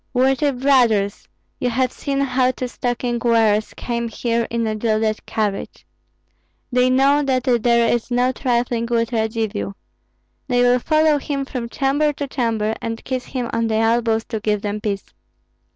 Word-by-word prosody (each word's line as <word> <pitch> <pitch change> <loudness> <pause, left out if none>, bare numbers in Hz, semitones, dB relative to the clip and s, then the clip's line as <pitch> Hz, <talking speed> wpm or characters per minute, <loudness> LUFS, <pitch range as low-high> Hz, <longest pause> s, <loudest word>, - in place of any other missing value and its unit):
"Worthy 265 +3 +3
brothers, 245 -7 +2 0.3
you 250 - 0
have 255 +1 0
seen 275 -1 -2
how 255 -1 +2
two 255 0 -3
stocking 245 0 -2
wearers 220 -3 +2
came 235 -1 -2
here 230 0 -1
in 230 -1 -1
a 220 - -1
gilded 215 0 0
carriage. 210 -3 -3 0.9
They 250 0 +3
know 275 +3 +4
that 260 -3 0
there 235 -2 +3
is 240 0 0
no 245 +1 +2
trifling 240 -2 -1
with 230 -1 0
Radzivill. 220 -3 -2 0.7
They 245 -2 +2
will 245 0 +4
follow 310 +2 +3
him 275 -1 -3
from 250 -4 -5
chamber 290 +4 +1
to 285 - -4
chamber, 225 -5 -1
and 230 0 -4
kiss 255 -1 -3
him 250 -2 -3
on 230 0 +1
the 220 - 0
elbows 225 0 +1
to 220 - -2
give 210 -1 -1
them 210 0 -3
peace. 200 -2 -3
240 Hz, 160 wpm, -20 LUFS, 225-255 Hz, 0.9 s, know